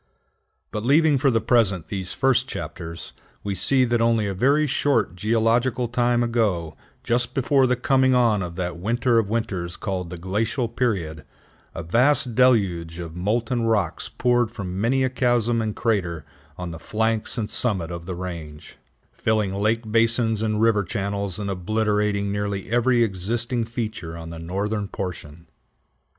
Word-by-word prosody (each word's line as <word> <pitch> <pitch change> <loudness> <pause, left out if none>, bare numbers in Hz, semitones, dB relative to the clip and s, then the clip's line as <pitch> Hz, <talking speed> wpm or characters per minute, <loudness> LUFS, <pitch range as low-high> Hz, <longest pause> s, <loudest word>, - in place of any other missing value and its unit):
But 105 - -4
leaving 145 +2 +4
for 135 - +3
the 115 -3 +2
present 110 -6 +2
these 95 -3 -3
first 130 -1 +2
chapters, 85 0 -7 0.3
we 100 - -2
see 130 +8 +2
that 120 -1 +1
only 115 -2 +2
a 100 - -2
very 140 +10 +3
short 135 - +1
geological 115 +5 +1
time 120 0 +1
ago, 100 -10 0 0.3
just 120 +1 0
before 135 0 +3
the 125 - +2
coming 130 +1 +3
on 115 -5 +3
of 85 -2 -5
that 90 -1 -3
winter 120 +4 +2
of 105 -3 -1
winters 95 -7 -2
called 95 -4 -3
the 90 - -7
glacial 110 +8 -1
period, 95 -10 -2 0.5
a 80 - -4
vast 125 - +2
deluge 95 -10 +2
of 85 -2 -7
molten 115 +6 0
rocks 115 -2 0
poured 120 -2 +1
from 100 -4 -5
many 130 +4 +2
a 130 - +2
chasm 120 -2 +1
and 110 -1 -3
crater 90 -9 -1 0.3
on 90 -1 -5
the 80 - -8
flanks 110 +3 -1
and 110 -2 -3
summit 100 -8 0
of 85 0 -7
the 90 - -4
range, 85 -4 -8 0.3
filling 105 -3 0
lake 110 +2 0
basins 115 -1 +2
and 110 -1 0
river 110 -2 +3
channels, 100 0 -3
and 105 -1 -4
obliterating 105 +1 0
nearly 100 0 -3
every 120 0 +3
existing 115 +4 -1
feature 110 -8 -5
on 80 0 -8
the 85 - -7
northern 100 +5 -2
portion. 85 -5 -7
110 Hz, 160 wpm, -23 LUFS, 90-120 Hz, 0.5 s, leaving